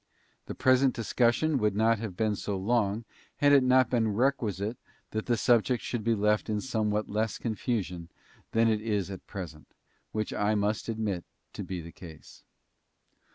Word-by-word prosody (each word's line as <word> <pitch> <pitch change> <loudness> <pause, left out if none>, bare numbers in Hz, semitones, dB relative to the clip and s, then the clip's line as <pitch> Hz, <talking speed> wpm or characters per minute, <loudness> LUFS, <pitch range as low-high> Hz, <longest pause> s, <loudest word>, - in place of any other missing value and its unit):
The - - -5
present 130 0 +3
discussion 120 +6 +1
would 105 -3 +1
not 110 +1 +3
have 105 -5 -6
been 110 -2 +1
so 100 0 -3
long 110 +1 0 0.3
had 145 0 +3
it 140 - +7
not 130 0 +4
been 115 -3 +2
requisite 115 -4 0 0.3
that 110 0 -3
the 120 -1 +2
subject 120 +1 +2
should 120 -3 -3
be 115 +1 +2
left 105 +1 +1
in 105 -1 0
somewhat 105 -3 -1
less 110 +1 -1
confusion 105 -7 -3 0.4
than 115 0 +3
it 110 -1 +1
is 105 -3 -1
at 95 - -9
present, 85 -6 -8 0.4
which 110 -1 -2
I 105 +1 +1
must 105 +2 -1
admit 105 -5 -2 0.3
to - - -5
be 90 -2 -5
the 85 +1 -10
case. 80 -2 -13
110 Hz, 165 wpm, -29 LUFS, 100-120 Hz, 0.4 s, it